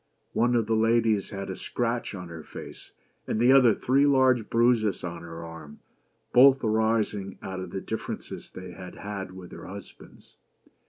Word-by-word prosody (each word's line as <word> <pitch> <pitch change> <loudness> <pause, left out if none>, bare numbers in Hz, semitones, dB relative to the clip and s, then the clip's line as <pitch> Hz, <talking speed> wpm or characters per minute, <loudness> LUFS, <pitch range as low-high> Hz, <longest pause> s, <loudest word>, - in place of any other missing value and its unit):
One 120 +1 +2
of 115 -2 +2
these 110 - +1
ladies 115 -2 +2
had 100 -1 -5
a - - -5
scratch 120 0 -2
on 90 -2 -8
her 80 -1 -8
face, - - -11 0.4
and 110 - -1
the 120 +2 +5
other, 125 -5 +6
three 135 +3 +3
large 130 -5 +3
bruises 115 -4 +2
on 85 -1 -5
her 85 0 -8
arm; 80 -3 -10 0.6
both 135 +1 +7
arising 110 -3 0
out 95 -1 -5
of 95 +1 -6
differences - - -6
they 90 -1 -9
had 90 0 -10
had 100 -2 -6
with 95 -1 -11
their - - -9
husbands. 100 +1 -12
105 Hz, 165 wpm, -27 LUFS, 95-120 Hz, 0.6 s, both